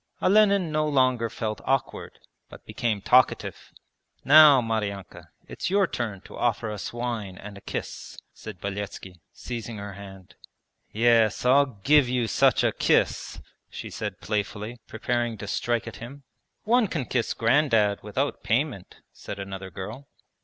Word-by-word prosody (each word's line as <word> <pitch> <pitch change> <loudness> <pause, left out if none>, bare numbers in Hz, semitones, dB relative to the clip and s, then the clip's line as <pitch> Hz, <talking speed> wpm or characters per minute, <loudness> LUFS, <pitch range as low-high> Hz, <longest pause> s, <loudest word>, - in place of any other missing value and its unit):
Olenin 200 -4 +3
no 155 0 +1
longer 130 -5 +2
felt 110 -1 -4
awkward, 135 -1 -2 0.3
but - - -14
became 110 -4 -2
talkative. 130 0 +2 0.5
'Now, 150 -1 +8
Maryanka, 105 -5 -4 0.2
it's - - -4
your 200 +1 +3
turn 110 - -4
to - - -13
offer 115 -2 -1
us 105 -3 -5
wine 115 -6 -4
and 105 0 -10
a 100 - -12
kiss,' - - -6 0.2
said 105 -5 -10
Beletski, 95 -2 -6
seizing 115 -2 -7
her 100 0 -7
hand. 95 -2 -12 0.6
'Yes, 115 0 +3
I'll 140 +3 +5 0.2
give 145 +1 +5
you 125 -1 0
such 110 - +3
a - - +3
kiss!' - - 0 0.3
she - - -8
said - - -5
playfully, 105 +2 -3
preparing 120 0 -2
to 105 - -7
strike 120 +3 -1
at 115 - -7
him. 135 +5 -10 0.4
'One 235 0 +3
can 155 -8 -3
kiss 120 -2 -1
Grandad 115 -4 +2
without 130 +7 -2
payment,' 120 - -2
said 100 - -8
another 95 -1 -7
girl. 105 - -8
115 Hz, 145 wpm, -25 LUFS, 105-135 Hz, 0.6 s, Now